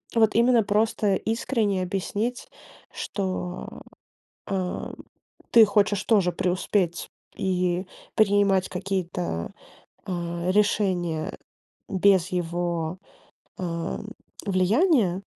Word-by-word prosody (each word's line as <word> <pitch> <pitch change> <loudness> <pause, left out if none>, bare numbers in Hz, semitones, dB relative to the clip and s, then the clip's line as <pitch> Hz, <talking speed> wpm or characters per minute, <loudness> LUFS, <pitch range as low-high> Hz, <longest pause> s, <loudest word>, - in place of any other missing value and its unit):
вот 220 -2 +4
именно 235 0 +5
просто 210 -1 +1
искренне 220 -4 0
объяснить, 205 +6 -3 0.4
что, 185 -2 -4 0.6
а, 185 -2 -3 0.6
ты 230 -2 +8
хочешь 205 0 +2
тоже 195 -6 +3
преуспеть 180 0 -1 0.3
и 180 0 0 0.3
принимать 200 -3 +3
какие-то, 180 - -3 0.5
а, 175 -1 -3
решения 185 -5 +1 0.5
без 190 -2 +3
его, 175 -1 -2 0.6
а, 170 -1 -3 0.5
влияния 200 - +3
190 Hz, 80 wpm, -25 LUFS, 180-210 Hz, 0.6 s, ты